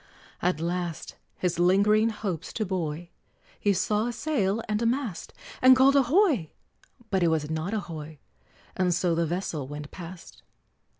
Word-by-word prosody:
At 180 -3 +1
last, 170 0 -3 0.2
his 175 -2 -1
lingering 205 +5 +4
hopes 205 -7 -4
to 215 - -1
buoy, 170 -3 -3 0.5
He 205 - +2
saw 210 +4 +1
a - - -1
sail 225 -5 -1
and 210 +1 -1
a 230 - +2
mast, 240 -6 -2 0.3
And 255 0 +8
called 270 +2 +5
"Ahoy!" 280 - +3 0.6
but 190 -2 +2
it 170 - +4
was 160 -2 0
not 160 +7 -2
a 215 - -1
hoy, 155 -4 -8 0.6
And 180 -2 +1
so 175 -1 +1
the 165 0 +1
vessel 165 -5 -3
went 145 +1 -8
past. 175 0 -10
185 Hz, 160 wpm, -27 LUFS, 165-220 Hz, 0.6 s, And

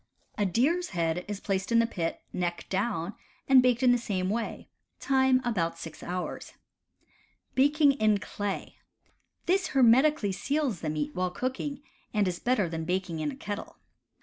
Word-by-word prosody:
A 205 -1 +1
deer's 300 - +1
head 165 +1 0
is 205 -1 -4
placed 195 +1 -2
in 230 - +5
the 230 - +5
pit, 170 -7 -3
neck 175 -1 -2
down, 195 -2 -1 0.3
and 265 -1 +7
baked 250 0 +2
in 250 - +6
the 245 - +3
same 190 -5 -1
way: 230 +1 -3 0.3
time 265 -1 +3
about 170 -8 0
six 165 -2 -9
hours. 180 +1 -5 1.0
Baking 290 +2 +4
in 215 -6 +2
Clay. 200 0 -5 0.3
— - - -44
This 375 +2 +2
hermetically 255 -2 +5
seals 255 - -1
the 155 - -2
meat 150 -1 -2
while 180 0 0
cooking, 260 +7 -4 0.3
and 205 -2 +3
is 175 -1 -2
better 240 -7 +1
than 165 -1 -4
baking 180 -1 -2
in 155 -1 -1
a - - -6
kettle. 205 0 -6
205 Hz, 165 wpm, -28 LUFS, 180-255 Hz, 1.0 s, and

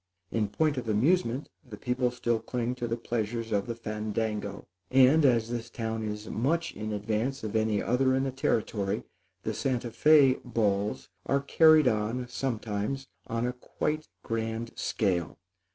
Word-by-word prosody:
In 110 -2 +1
point 150 +7 +1
of 120 -3 -3
amusement 130 - +2 0.2
the 120 -7 -10
people 125 +2 0
still 120 -2 0
cling 120 +2 -2
to 120 -1 -4
the 115 0 -1
pleasures 115 -1 -3
of 100 0 0
the 115 - -3
fandango; 110 -2 -3 0.2
and, 135 +4 +6
as 120 -5 +4
this 120 -1 -4
town 115 -1 -3
is 105 0 -4
much 160 +8 0
in 110 0 -4
advance 110 +6 -2
of 110 0 -4
any 110 -2 +1
other 130 +2 +2
in 135 - +1
the 135 - -1
Territory, 105 -5 -1 0.4
the 110 - -2
Santa 125 0 -1
Fé 145 -1 +5
balls 105 0 0 0.2
are 140 - +3
carried 155 +2 +5
on, 115 +4 0
sometimes, 120 +1 -3 0.2
on 115 +2 -1
quite 155 +4 -2
a - - -25
grand 115 0 -2
scale. 90 -6 -1
115 Hz, 155 wpm, -29 LUFS, 110-130 Hz, 0.4 s, and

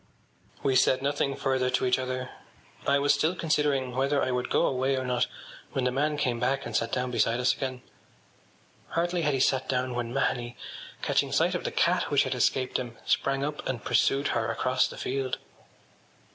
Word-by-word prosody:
” - - -29
We 135 -1 +2
said 130 +1 +3
nothing 140 -1 0
further 130 -1 0
to 125 0 +1
each 125 0 +2
other. 130 0 -3 0.6
I 140 - +4
was 140 0 +3
still 155 +5 +1
considering 145 -6 0
whether 140 +2 +1
I 130 - 0
would 125 0 -1
go - - +3
away 130 +1 +1
or 130 0 -2
not 125 -1 +1 0.5
when 135 - 0
the 125 - +1
man 145 +3 0
came 125 -5 0
back 135 +3 0
and 115 - -5
sat 115 - 0
down 125 0 -1
beside 115 0 +1
us 125 - +3
again. 130 -2 -4 1.0
Hardly 175 +1 0
had 150 -3 +1
he - - -1
sat 130 0 +1
down 130 -1 0
when 120 -1 -3
Mahony, 120 -2 -1 0.5
catching - - +1
sight - - +2
of - - -3
the - - -1
cat - - +2
which - - +4
had - - -2
escaped 130 -1 +1
him, 120 -2 -6
sprang 135 0 +1
up 150 0 -4
and 120 -4 -4
pursued 140 +1 +2
her 115 -1 0
across 130 0 +1
the - - -10
field. 130 0 -2
130 Hz, 200 wpm, -28 LUFS, 125-140 Hz, 1.0 s, I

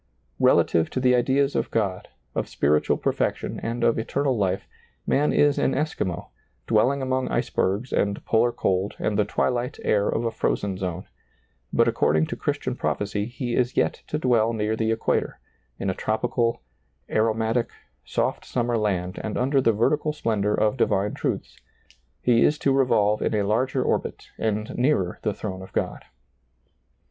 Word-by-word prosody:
Relative 80 -1 +3
to - - -2
the 125 -1 +4
ideas 135 +3 +2
of - - 0
God, 100 -5 -1 0.3
of - - -2
spiritual 75 +1 +2
perfec - - 0
tion - - -6
and 115 +1 -3
of 115 - +3
eternal 135 +3 0
life, 100 -4 -1 0.4
man 145 +2 +2
is 145 -1 +3
an - - +2
Eskimo, 130 - -2 0.4
dwelling 130 +5 +2
among 130 0 0
icd>ergs 100 +7 -1
and 100 0 0
polar 120 +2 +3
cold 95 -2 -1
and 105 - -1
the 105 0 +2
twilight 125 +2 -1
air 105 -1 +2
of 115 - -1
a 115 - 0
frozen 100 -3 -1
zone; 90 -1 -4 0.7
but - - +3
according 80 +1 +2
to - - -5
Christian - - -2
prophecy 105 0 -2
he 120 -1 -3
is 125 0 0
yet - - +1
to 150 - -2
dwell 115 -5 +2
near 110 0 0
the 110 0 0
equator, 115 0 -1 0.4
in 100 - -3
a 95 - +1
tropical, 115 - -1 0.4
aromatic, 110 +2 +1 0.3
soft - - -1
summer 120 -2 -1
land 95 -3 -1
and 110 - -3
under 135 +2 +2
the 115 - +4
vertical 150 +8 +1
splendor 105 -7 0
of 110 +4 +1
divine 105 -3 +1
truths; - - -3 0.7
be 120 -2 +4
is 150 - +3
to 140 -2 +1
revolve 110 -6 +3
in - - 0
a 105 - +1
lai^er 120 +6 +1
orbit - - -2
and 110 -1 -1
nearer 120 -9 +1
the 110 - 0
throne 95 -2 -6
of 95 - -11
Ciod. - - -1
115 Hz, 165 wpm, -25 LUFS, 105-125 Hz, 0.7 s, the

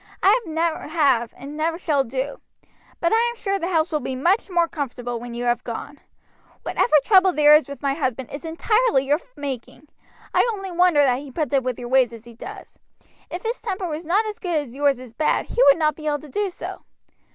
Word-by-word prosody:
I 410 +6 +6
never 325 0 -1
have 275 -8 +2
and 280 +3 -9
never 325 +2 -1
shall 300 -6 +1
do. 265 +3 -4 0.6
But 340 - +1
I - - +5
am 475 - -6
sure 395 -4 -2
the 340 - -2
house 330 -2 +1
will 305 - +1
be 265 - -4
much 355 - +1
more 345 -2 +2
comfortable 245 -6 -4
when 240 0 -8
you 240 - -4
have 240 0 0
gone. 265 +5 -7 0.6
Whatever - - +1
trouble 380 -3 +5
there 300 -1 +6
is 305 -1 +2
with 280 +1 -9
my 275 -1 +1
husband 260 -4 -3
is 285 - -7
entirely 340 - +1
your 290 +3 +2 0.2
making. 280 +1 -7 0.4
I 475 - +3
only 390 -2 -6
wonder 350 -4 +4
that 255 -2 +2
he 285 0 -9
puts 290 0 -3
up 275 - +4
with 255 -1 -2
your 240 -1 -7
ways 255 -2 +3
as 230 0 -11
he 235 - -12
does. 230 - -11 0.5
If 355 - -6
his 465 +2 -3
temper 390 -5 -3
was 315 0 -4
not 405 +6 +2
as 425 -1 -5
good 355 -3 -2
as 290 -6 -2
yours 280 -2 +2
is 250 -3 -11
bad 305 +6 +1
he 485 - 0
would 280 - +7
not 305 -2 +2
be 305 -1 -7
able 295 -1 +1
to 300 0 -13
do 410 +5 -1
so." 355 - -7
300 Hz, 225 wpm, -23 LUFS, 265-350 Hz, 0.6 s, would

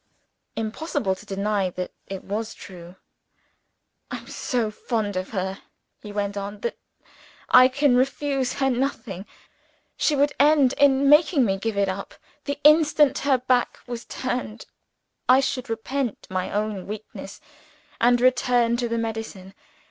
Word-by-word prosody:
(Impossible 225 - -2
to 190 +3 -12
deny 200 -1 0
that 180 0 -5 0.2
it 195 -1 -6
was 215 +3 -4
true.) 175 -1 -11 1.1
"I - - -4
am - - -13
so 235 -4 -2
fond 210 -2 -2
of 185 0 -3
her," 190 -1 -3 0.4
he 210 - -9
went 205 -1 -2
on, 200 +1 -6
"that 235 - -2 0.8
I 255 0 +9
can 265 0 +2
refuse 270 0 0
her 270 -1 +1
nothing. 240 -7 -3 0.7
She 300 - +2
would 285 +1 +2
end 285 -2 +5
in 280 -1 +4
making 295 -1 +5
me 195 -2 0
give 220 0 -3
it 200 -1 +2
up. 190 +1 -5 0.3
The 285 0 -2
instant 300 -2 +5
her 275 -2 +2
back 250 -1 +1
was 240 -1 -6
turned, 245 -3 -4 0.6
I 255 +1 +7
should 260 -1 -2
repent 235 +2 -3
my 185 -1 -2
own 210 -2 -2
weakness, 215 +1 -8 0.6
and 245 +1 +4
return 245 -1 +3
to 240 -1 -2
the 230 - -1
medicine. 225 -4 -5
235 Hz, 145 wpm, -24 LUFS, 200-270 Hz, 1.1 s, I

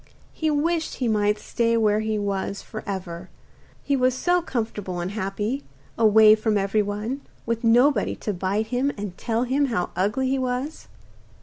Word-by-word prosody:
He 315 - -1
wished 320 +2 0
he 250 - -1
might 210 -1 +2
stay 230 +2 0
were 210 -2 +3
he 220 0 -1
was 200 -1 -2
for 215 - -7
ever, 185 -2 -5 0.5
he 280 - +1
was 255 -1 +2
so 355 +6 +2
comfortable 220 - -3
and 175 +2 -3
happy, 205 +6 -3 0.3
away 220 -1 +7
from 215 0 +1
everyone, 210 +5 -1 0.2
with 230 +1 -2
nobody 240 +1 +4
to 210 - -3
bite 195 +4 -1
him 265 +3 +1
and 200 -3 -5
tell 230 0 -1
him 270 +3 +1
how 215 -9 -1
ugly 210 +8 0
he 270 +1 +1
was. 255 +4 -3
220 Hz, 165 wpm, -24 LUFS, 205-255 Hz, 0.5 s, away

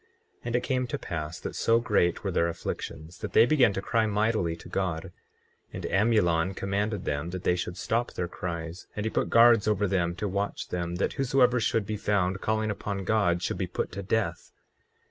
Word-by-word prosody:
24:10 - - -36 0.4
And 120 0 -1
it 120 - +1
came 125 0 0
to - - -3
pass 85 0 -5
that - - -6
so 115 0 +3
great 90 -7 +1
were - - -1
their 85 - +2
afflictions 85 0 -6
that - - -6
they 115 - +7
began 125 -5 +4
to 95 - -3
cry 115 -1 +1
mightily 105 -5 +1
to 80 - -13
God. 90 -4 -2 0.7
24:11 - - -30
And - - -5
Amulon 95 -4 +2
commanded 100 +1 -2
them 75 +3 -2
that 90 0 -6
they 90 - +3
should 90 0 -4
stop 115 +5 -1
their 90 - -2
cries; 85 0 -6
and 105 - -3
he 110 - -1
put - - 0
guards 115 -2 +6
over 105 -1 +2
them 85 -2 0
to 105 +4 -3
watch 100 +1 -3
them, 85 -1 -3
that 90 - 0
whosoever 125 -2 +3
should 115 -1 +1
be 105 +1 -3
found 100 -2 0
calling 110 0 0
upon 100 -1 -4
God 90 -4 +1
should - - -2
be - - -1
put - - -3
to 100 - -5
death. 105 +2 -2
100 Hz, 210 wpm, -28 LUFS, 85-110 Hz, 0.7 s, they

